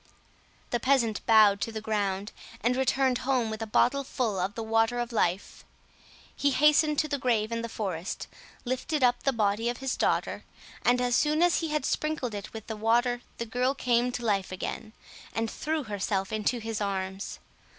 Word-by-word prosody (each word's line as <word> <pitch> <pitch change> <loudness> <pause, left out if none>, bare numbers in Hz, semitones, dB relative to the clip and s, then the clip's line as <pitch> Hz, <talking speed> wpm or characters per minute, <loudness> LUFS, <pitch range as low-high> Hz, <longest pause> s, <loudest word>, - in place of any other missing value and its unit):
The 240 - +1
peasant 235 -4 +2
bowed 215 -3 +6
to 230 - -2
the 220 - -4
ground, 205 -2 -2 0.3
and 245 +2 +2
returned 260 -1 +2
home 255 -4 0
with 220 0 -5
a 225 - -3
bottle 275 +6 +2
full 230 -7 -2
of 190 +3 -2
the 225 - -4
water 225 +2 +2
of 240 0 -2
life. 190 -4 -1 0.7
He 285 - +2
hastened 300 +2 +4
to 305 - +2
the 285 -1 -2
grave 230 -4 +1
in 230 0 -1
the 230 - -5
forest, 190 -5 -4 0.4
lifted 260 +4 -1
up 245 -1 +3
the 275 - +2
body 220 0 +1
of 240 - -3
his 270 -1 -2
daughter, - - 0 0.4
and 245 0 +4
as 245 -1 +1
soon 305 +2 +3
as 350 -1 +3
he 330 - -2
had 300 -3 -1
sprinkled 305 -7 -1
it 205 -1 -6
with 220 -1 -8
the 220 - -5
water 240 +3 +2 0.2
the 235 - -3
girl 250 +4 0
came 245 -1 +1
to 240 - -4
life 195 -4 0
again, 210 +3 -5 0.4
and 225 0 -1
threw 310 0 -2
herself 200 -2 -2
into 215 +3 0
his 225 -1 -4
arms. 190 -1 -3
230 Hz, 190 wpm, -28 LUFS, 215-255 Hz, 0.7 s, bowed